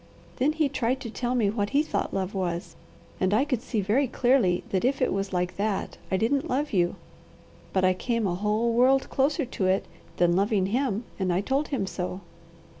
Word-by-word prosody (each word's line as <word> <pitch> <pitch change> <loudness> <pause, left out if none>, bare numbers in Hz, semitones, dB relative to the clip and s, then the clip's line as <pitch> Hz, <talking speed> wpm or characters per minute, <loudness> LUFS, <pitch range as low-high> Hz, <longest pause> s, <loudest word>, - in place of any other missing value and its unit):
Then 290 +4 +2
he 310 -2 +2
tried 260 -1 -1
to 230 - -6
tell 245 +2 -2
me 215 -5 +2
what 205 -2 -1
he 295 - +4
thought - - -2
love 190 0 -2
was, 175 -3 -3 0.4
and 190 +2 +2
I 265 - +3
could 255 -6 -1
see 235 -4 -2
very 230 +8 +2
clearly 240 -8 +2
that 190 - +1
if 265 +3 +1
it 255 - +1
was 195 0 -2
like 180 -1 -1
that, 205 -1 -2
I 190 - +1
didn't 270 +7 0
love 285 +2 -1
you, 175 -2 +2 0.8
but 190 -1 +2
I 185 - +4
came 230 +3 -1
a 180 - 0
whole 210 +5 0
world 260 +3 +3
closer 290 +3 +1 0.2
it 190 +1 +2 0.3
than 175 0 +3
loving 200 0 +2
him, 230 +1 0 0.2
and 185 -2 +1
I 175 +2 +1
told 270 +7 0
him 255 -9 -1
so. 185 0 -4
215 Hz, 200 wpm, -26 LUFS, 190-260 Hz, 0.8 s, he